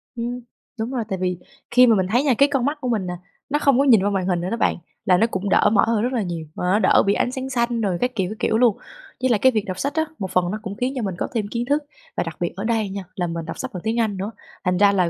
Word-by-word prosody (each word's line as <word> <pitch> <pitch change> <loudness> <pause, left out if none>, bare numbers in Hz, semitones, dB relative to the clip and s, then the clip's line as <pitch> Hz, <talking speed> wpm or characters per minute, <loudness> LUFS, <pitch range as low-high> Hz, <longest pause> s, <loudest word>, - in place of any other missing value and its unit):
Ừm, 240 +1 -3 0.4
đúng 225 +3 -2
rồi, 250 -3 -1
tại 190 - -1
vì 180 -1 0 0.3
khi 250 0 +7
mà 230 - +5
mình 190 -2 +1
thấy 245 +4 +3
nha, 280 -3 +3
cái 280 +1 +5
con 270 -4 0
mắt 290 +2 0
của 255 - -2
mình 215 -5 0
nè 180 - -3 0.4
nó 295 +1 +1
không 275 -3 +3
có - - +5
nhìn 225 -8 +6
qua 205 - +2
màn 195 -2 -1
hình 175 -2 +1
nữa 180 - -3
đó 230 - -2
bạn - - +2 0.3
là 180 -1 +5
nó 225 - +3
cũng 200 -3 -3
đỡ - - +4
mỏi 200 - +5
hơn 225 -2 +2
rất 250 +2 -1
là 240 - +1
nhiều, 170 -4 -4
mà - - -5
nó 190 +4 +3
đỡ - - +5
bị 200 - +3
ánh 245 - 0
sáng 260 +1 -4
xanh 235 -2 0
rồi 190 -5 0
các 250 - +1
kiểu, 190 -4 0
các 215 - -5
kiểu 220 - +1
luôn. 235 -3 +4 0.4
Với 260 - +2
lại 230 -4 +3
cái 260 +5 +5
việc 215 -4 0
đọc 185 -1 -5
sách 280 +1 -1
á, 315 0 +1
một 190 -3 -4
phần 180 -1 +1
nó 215 - -3
cũng 200 -2 -6
khiến 250 +5 -1
cho 255 - -2
mình 190 -3 -2
có - - -2
thêm 220 -4 -1
kiến 235 0 -2
thức 290 +4 +1 0.3
và - - +2
đặc 165 -2 -7
biệt 175 - -2
ở 195 - -5
đây 225 -2 0
nha 195 0 -5
là 175 -2 -1
mình 165 -1 -4
đọc 165 - -6
sách - - -5
bằng 180 - -5
tiếng 225 +2 0
Anh 215 -4 0
nữa, 195 +3 -3 0.3
thành 180 0 +1
ra 200 +1 +5
là 185 -3 +2
215 Hz, 330 wpm, -22 LUFS, 190-245 Hz, 0.4 s, khi